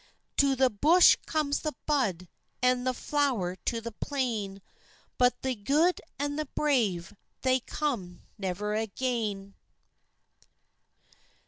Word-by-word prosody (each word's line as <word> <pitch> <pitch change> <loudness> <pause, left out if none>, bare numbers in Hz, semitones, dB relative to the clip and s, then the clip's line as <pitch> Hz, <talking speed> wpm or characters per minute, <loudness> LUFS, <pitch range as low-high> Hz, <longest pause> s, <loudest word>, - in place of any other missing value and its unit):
To 275 -1 +4
the 260 0 +3
bush 315 - +6
comes 300 -2 0
the 305 -4 -3
bud, 210 - 0 0.4
An' 250 0 +3
the 255 - +1
flower 250 -14 0
to 230 - 0
the 235 0 -6
plain, 215 -6 -3 0.6
But 250 0 +3
the 260 -1 0
gude 290 - +2 0.2
and 290 +1 -2
the 305 - -2
brave 210 - +1 0.3
They 260 0 +3
come 240 -11 -3
never 205 +1 -3
again. 215 -2 -2
250 Hz, 115 wpm, -29 LUFS, 205-285 Hz, 0.6 s, bush